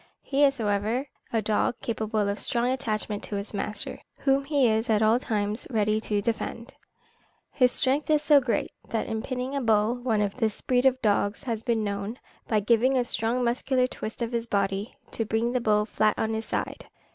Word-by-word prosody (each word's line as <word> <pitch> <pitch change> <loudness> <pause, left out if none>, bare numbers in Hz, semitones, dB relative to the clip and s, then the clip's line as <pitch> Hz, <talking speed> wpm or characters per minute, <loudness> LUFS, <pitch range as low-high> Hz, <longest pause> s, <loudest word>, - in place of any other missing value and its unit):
He 280 +1 +1
is, 275 -1 +4
however, 215 +4 0 0.3
a 225 -2 0
dog 215 +3 +1
capable 220 -2 -1
of 200 +1 -2
strong 240 +1 0
attachment 215 -5 -2
to 205 - -5
his 200 +2 -5
master, 205 +1 -4 0.2
whom 275 0 +3
he 280 -3 +3
is 220 +2 +1
at 220 -1 +3
all 220 +3 +4
times 215 -2 -1
ready 215 -2 +1
to 205 -2 -1
defend. 230 +2 -3 0.8
His 250 -3 +3
strength 275 +5 0
is 300 -1 +3
so 295 -1 +6
great, 245 -2 -1 0.2
that 225 - -1
in 220 0 -3
pinning 255 +2 -3
a 280 - 0
bull, 220 -1 +3
one 235 -4 0
of 205 +1 -1
this 220 -4 0
breed 250 +1 +3
of 260 -1 +2
dogs 205 -1 +1
has 230 -5 -2
been 230 -2 0
known, 200 +3 -3 0.3
by 215 -2 +2
giving 235 +5 +3
a 250 - +3
strong 240 +1 0
muscular 250 +2 +1
twist 235 -2 -5
of 230 - -3
his 235 -1 -2
body, 200 +3 -1
to 225 - -2
bring 225 +2 0
the 250 0 0
bull 210 -2 +2
flat 215 -1 +1
on 220 0 0
his 220 0 -3
side. - - -3
225 Hz, 200 wpm, -27 LUFS, 215-250 Hz, 0.8 s, so